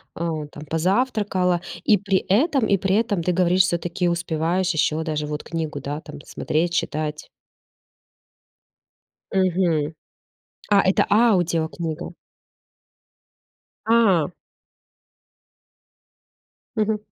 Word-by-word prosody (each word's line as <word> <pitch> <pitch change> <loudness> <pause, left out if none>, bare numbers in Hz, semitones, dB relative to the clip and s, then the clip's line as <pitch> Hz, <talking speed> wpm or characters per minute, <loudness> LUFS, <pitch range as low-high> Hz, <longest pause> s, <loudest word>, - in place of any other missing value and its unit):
э, - - -8 0.3
там 150 - -10
позавтракала, 185 0 +1 0.2
и 210 - +5
при 195 0 0
этом 250 - +2
и 200 - +3
при 190 +1 0
этом 210 -5 0
ты 180 - +1
говоришь, 180 +1 +3
всё-таки 175 0 -1
успеваешь 170 +2 0
ещё 155 +1 +1
даже 155 -2 -2
вот 150 0 -4
книгу, 165 -1 -4
да, 145 +2 -5
там 150 - -10
смотреть, 170 +3 -1
читать. 155 -2 -2 2.1
Мгм. 175 -5 +1 0.8
А, 200 -1 +5
это 190 0 +2
аудиокнига. 170 -6 +1 1.7
А. 220 -9 +4 2.5
Мгм. 215 0 +1
175 Hz, 95 wpm, -23 LUFS, 160-195 Hz, 2.5 s, и